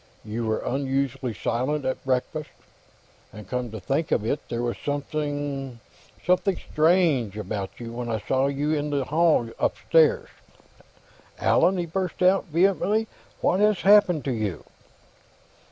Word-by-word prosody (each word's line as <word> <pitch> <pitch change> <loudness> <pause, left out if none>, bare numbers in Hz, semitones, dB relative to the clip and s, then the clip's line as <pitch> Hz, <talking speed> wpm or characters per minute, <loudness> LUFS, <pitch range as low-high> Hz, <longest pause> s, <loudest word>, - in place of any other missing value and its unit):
You 110 +2 -3
were 110 - -1
unusually 135 -2 -1
silent 130 +8 -1
at 130 - -2
breakfast. 135 +4 -2 0.8
And 105 -2 -11
come 125 +1 -3
to 110 0 -7
think 140 - -1
of 110 - +1
it, 140 +6 0
there 120 0 -2
was 120 -1 -2
something... 145 -3 -3 0.5
something 185 +2 +2
strange... 155 - +2
about 100 -1 -5
you 115 -1 -7
when 120 0 -4
I 110 -1 -1
saw 135 +1 +2
you 140 +2 -1
in 150 -1 -1
the 140 -2 0
hall, 155 -5 +3
upstairs.... 160 -2 +2 1.1
Allan!" 185 +3 +3
he 175 - -1
burst 180 +1 -3
out, 190 +2 +4
vehemently. 195 +5 +1 0.3
"What 185 - +2
has 210 -2 +3
happened 190 -6 +5
to 135 - 0
you?" 105 -8 -3
140 Hz, 140 wpm, -25 LUFS, 120-165 Hz, 1.1 s, happened